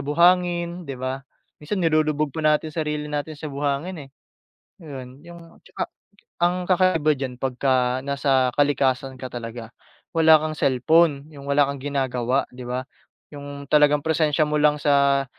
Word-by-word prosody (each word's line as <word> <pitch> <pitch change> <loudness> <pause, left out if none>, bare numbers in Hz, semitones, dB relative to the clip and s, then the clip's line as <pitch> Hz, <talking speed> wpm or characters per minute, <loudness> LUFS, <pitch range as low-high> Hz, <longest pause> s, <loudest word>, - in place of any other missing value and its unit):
buhangin 175 +3 +2
'di 135 - -5
ba? 130 +1 -4 0.4
Minsan 180 +5 -3
nilulubog 155 -2 +1
pa 160 - -4
natin 155 0 +1
sarili 150 -1 -3
natin 150 +1 -4
sa 155 +1 -7
buhangin 145 +2 -3
eh. - - -31 0.7
Yun, 135 -5 -10
yung 170 0 -11 0.2
at - - -45
saka - - -4 0.6
ang 175 +1 +3
kakaiba 180 -4 +3
diyan, 130 -2 -4
pagka 130 -1 0
nasa 135 -2 +1
kalikasan 135 -2 +1
ka 130 - -5
talaga 115 -1 -7 0.4
wala 160 -1 +7
kang 155 0 -3
cellphone 140 +3 +3
yung 140 -1 -11
wala 140 0 +4
kang 140 - -7
ginagawa, 130 -2 -1
'di 125 0 -9
ba? 125 +1 -3 0.5
Yung 140 0 -8
talagang 150 0 +4
presensya 155 -1 +2
mo 150 - -1
lang 150 0 +3
sa 140 -1 +3
145 Hz, 150 wpm, -23 LUFS, 135-155 Hz, 0.7 s, wala